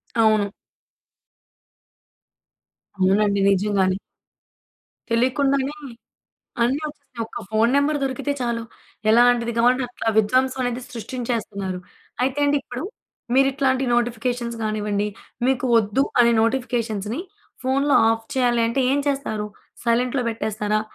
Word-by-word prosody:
అవును. 215 Hz, -3 st, +3 dB, 2.5 s
అవునండి. 200 Hz, +2 st, +3 dB
నిజంగానే. 195 Hz, -1 st, +2 dB, 1.1 s
తెలియకుండానే 270 Hz, +4 st, +1 dB, 0.9 s
అన్ని 265 Hz, +6 st, +1 dB
వస్తున్నాయి. 285 Hz, -5 st, -9 dB
ఒక్క -, -, -9 dB
ఫోన్ 225 Hz, +3 st, +3 dB
నంబర్ 290 Hz, +1 st, +2 dB
దొరికితే 270 Hz, +2 st, -1 dB
చాలు. 235 Hz, -1 st, -1 dB, 0.5 s
ఎలాంటిది 235 Hz, 0 st, +4 dB
కావాలంటే 250 Hz, +2 st, +3 dB
అట్లా 245 Hz, -2 st, -6 dB
విధ్వంసం 255 Hz, +5 st, +2 dB
అనేది 245 Hz, 0 st, -2 dB
సృష్టించేస్తున్నారు. 225 Hz, -5 st, -4 dB, 0.4 s
అయితే 270 Hz, +2 st, 0 dB
అండి, 290 Hz, 0 st, +3 dB
ఇప్పుడు 250 Hz, +5 st, -6 dB, 0.5 s
మీరు 270 Hz, 0 st, +5 dB
ఇట్లాంటి 265 Hz, -1 st, +1 dB
నోటిఫికేషన్స్ 240 Hz, 0 st, -1 dB
కానివ్వండి, 210 Hz, -1 st, -1 dB, 0.4 s
మీకు 265 Hz, -1 st, +1 dB
వద్దు 220 Hz, +4 st, +2 dB, 0.2 s
అనే 235 Hz, 0 st, +5 dB
నోటిఫికేషన్స్‌ని 230 Hz, -, -1 dB, 0.4 s
ఫోన్‌లో 275 Hz, +2 st, +2 dB
ఆఫ్ 225 Hz, 0 st, -1 dB
చేయాలి 240 Hz, -2 st, +2 dB
అంటే 260 Hz, +3 st, 0 dB
ఏం 285 Hz, -, +2 dB
చేస్తారు? 220 Hz, -7 st, -2 dB, 0.4 s
సైలెంట్‌లో 245 Hz, +2 st, +1 dB
పెట్టేస్తారా? 215 Hz, -1 st, -1 dB
235 Hz, 105 wpm, -22 LUFS, 215-260 Hz, 2.5 s, మీరు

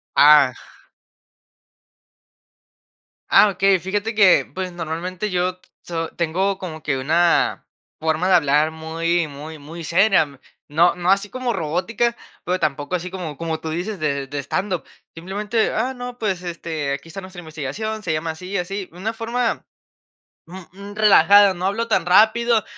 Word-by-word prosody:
Ah. 145 Hz, -3 st, +7 dB, 2.8 s
Ah, 210 Hz, -, +6 dB
okey. 195 Hz, -1 st, +2 dB
Fíjate 205 Hz, +5 st, -2 dB
que 200 Hz, -4 st, +5 dB
pues, 185 Hz, -1 st, -4 dB
normalmente 175 Hz, +4 st, -4 dB
yo 180 Hz, 0 st, -1 dB, 0.2 s
so 165 Hz, -1 st, -4 dB
Tengo 185 Hz, +4 st, 0 dB
como 160 Hz, -5 st, -7 dB
que 140 Hz, -3 st, -1 dB
una 165 Hz, +6 st, +2 dB, 0.3 s
forma 160 Hz, +3 st, 0 dB
de 185 Hz, -, +6 dB
hablar, 150 Hz, 0 st, +3 dB
muy 165 Hz, +1 st, -1 dB
muy, 150 Hz, +2 st, -9 dB
muy 165 Hz, +4 st, -9 dB
seria. 165 Hz, -5 st, +2 dB, 0.3 s
No 170 Hz, +4 st, +3 dB
no 180 Hz, +1 st, +1 dB
así 200 Hz, +1 st, +1 dB
como 255 Hz, -1 st, -2 dB
robótica, 190 Hz, +8 st, -1 dB, 0.3 s
pero 180 Hz, +1 st, 0 dB
tampoco, 145 Hz, +2 st, -1 dB
así 180 Hz, +1 st, -4 dB
como 165 Hz, -7 st, -6 dB
como 165 Hz, -1 st, -3 dB
tú 160 Hz, -, -6 dB
dices, 180 Hz, +4 st, -4 dB
de 140 Hz, -3 st, -1 dB
de 145 Hz, +1 st, -4 dB
stand 190 Hz, +5 st, -2 dB
up. 175 Hz, -, -3 dB, 0.3 s
Simplemente: 205 Hz, +6 st, -1 dB
"Ah, 250 Hz, +4 st, -1 dB
no, 245 Hz, -1 st, -7 dB
pues, 195 Hz, -6 st, -2 dB
este, 160 Hz, -5 st, -4 dB
aquí 140 Hz, -, -7 dB
está 180 Hz, -, -7 dB
nuestra 185 Hz, -1 st, -10 dB
investigación, 160 Hz, +8 st, -5 dB
se 170 Hz, -, -1 dB
llama 160 Hz, +1 st, -2 dB
así, 180 Hz, +4 st, -10 dB
y 200 Hz, -, -1 dB
así". 195 Hz, +1 st, -4 dB
Una 200 Hz, +6 st, -4 dB
forma 230 Hz, +1 st, -2 dB, 0.8 s
mm 175 Hz, +3 st, -11 dB, 0.2 s
m 200 Hz, +1 st, -10 dB
relajada. 205 Hz, -1 st, +6 dB
No 180 Hz, +1 st, -3 dB
hablo 225 Hz, +4 st, -1 dB
tan 175 Hz, -2 st, +1 dB
rápido, 220 Hz, +4 st, +4 dB
180 Hz, 155 wpm, -21 LUFS, 160-200 Hz, 2.8 s, Ah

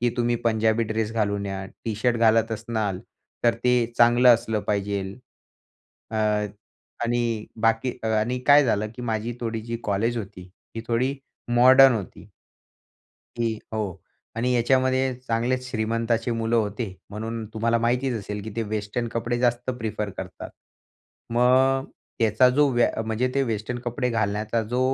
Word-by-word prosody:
की 120 Hz, 0 st, +2 dB
तुम्ही 120 Hz, -1 st, +1 dB
पंजाबी 110 Hz, 0 st, +2 dB
ड्रेस 110 Hz, 0 st, -2 dB
घालून 100 Hz, -2 st, -1 dB
या 95 Hz, 0 st, -4 dB, 0.2 s
टी-शर्ट 115 Hz, +2 st, 0 dB
घालत 115 Hz, 0 st, +3 dB
असनार 110 Hz, -4 st, -2 dB, 0.4 s
तर, 115 Hz, -, +4 dB
ते 125 Hz, +2 st, +1 dB, 0.2 s
चांगलं 120 Hz, +1 st, +5 dB
असलं 110 Hz, -2 st, -2 dB
पाहिजे. 100 Hz, -1 st, -2 dB, 0.9 s
अ, 110 Hz, -, -3 dB, 0.9 s
आणि 115 Hz, -2 st, -1 dB
बाकी 115 Hz, +3 st, +2 dB
आणि 110 Hz, +3 st, 0 dB
काय 145 Hz, 0 st, +7 dB
झालं, 105 Hz, -3 st, +1 dB
की 125 Hz, -, -7 dB
माझी 115 Hz, 0 st, -2 dB
थोडी 115 Hz, -1 st, -3 dB
जी 115 Hz, +1 st, -4 dB
कॉलेज 110 Hz, +4 st, 0 dB
होती 95 Hz, -3 st, -8 dB, 0.3 s
ती 115 Hz, -, -4 dB
थोडी 125 Hz, +4 st, 0 dB, 0.4 s
मॉडर्न 130 Hz, +1 st, +8 dB
होती. 100 Hz, -2 st, -7 dB, 1.1 s
की 115 Hz, -2 st, -1 dB
हो. 105 Hz, -5 st, -3 dB, 0.4 s
आणि 125 Hz, +2 st, +1 dB
याच्यामध्ये 130 Hz, +1 st, +2 dB
चांगलेच 125 Hz, +2 st, -1 dB
श्रीमंताची 115 Hz, +1 st, -1 dB
मुलं 115 Hz, 0 st, 0 dB
होते 105 Hz, -2 st, -2 dB, 0.2 s
म्हणून 110 Hz, +2 st, -5 dB
तुम्हाला 115 Hz, +1 st, +1 dB
माहितीच 125 Hz, +2 st, 0 dB
असेल, 105 Hz, 0 st, -6 dB
की 110 Hz, -, -6 dB
ते 115 Hz, -, 0 dB
वेस्टर्न 110 Hz, +2 st, -3 dB
कपडे 120 Hz, +1 st, -1 dB
जास्त 120 Hz, +1 st, +1 dB
प्रिफर 105 Hz, -2 st, -3 dB
करतात. -, -, -7 dB, 0.8 s
मग 130 Hz, +2 st, +3 dB, 0.3 s
त्याचा 115 Hz, +3 st, +4 dB
जो 145 Hz, -1 st, +5 dB
व्या 120 Hz, -1 st, +3 dB, 0.2 s
म्हणजे 110 Hz, +3 st, 0 dB
ते 140 Hz, -, +2 dB
वेस्टर्न 115 Hz, 0 st, -3 dB
कपडे 125 Hz, +1 st, -1 dB
घालण्याचा 110 Hz, +1 st, -1 dB
जो 125 Hz, +1 st, 0 dB
115 Hz, 140 wpm, -24 LUFS, 110-120 Hz, 1.1 s, मॉडर्न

